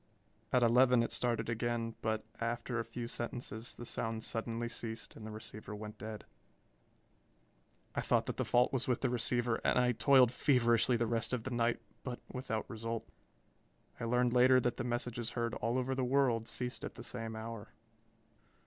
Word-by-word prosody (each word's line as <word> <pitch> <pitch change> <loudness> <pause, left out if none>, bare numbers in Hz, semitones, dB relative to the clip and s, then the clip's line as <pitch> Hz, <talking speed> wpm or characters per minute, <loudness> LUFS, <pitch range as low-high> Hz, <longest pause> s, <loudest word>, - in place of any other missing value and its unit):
At 125 -1 +4
eleven 125 +1 +5
it - - -3
started 115 -2 0
again 115 0 -1
but 110 0 -1
after 120 +1 -2
a - - 0
few 115 +1 -5
sentences 120 -1 -4
the 120 - -8
sound 115 -1 -3
suddenly 115 +1 -2
ceased 115 -1 -5
and 110 - -8
the - - -6
receiver 105 -1 -7
went 105 0 -8
dead. 110 0 -6 1.7
I - - 0
thought - - +2
that - - -4
the - - +1
fault 125 +3 +3
was 130 -2 0
with 125 -2 +1
the 130 - +1
receiver 120 -1 +1
and - - +3
I 125 0 +4
toiled 130 0 +5
feverishly 120 -2 +3
the 115 - +1
rest 115 +2 0
of 120 -3 -1
the 130 - -4
night, 120 -1 +1 0.2
but 125 -2 -5
without 125 -4 -3
result. 115 0 -4 0.9
I - - -2
learned 125 +1 +2
later 130 +1 +6
that 120 -1 0
the 120 - -2
messages 120 -1 -2
heard 115 -1 0
all 115 +3 0
over 130 +1 0
the 130 0 0
world 125 -3 +2
ceased 125 0 -3
at - - -5
the - - -8
same 115 -2 -4
hour. 110 -1 -6
120 Hz, 180 wpm, -34 LUFS, 115-125 Hz, 1.7 s, later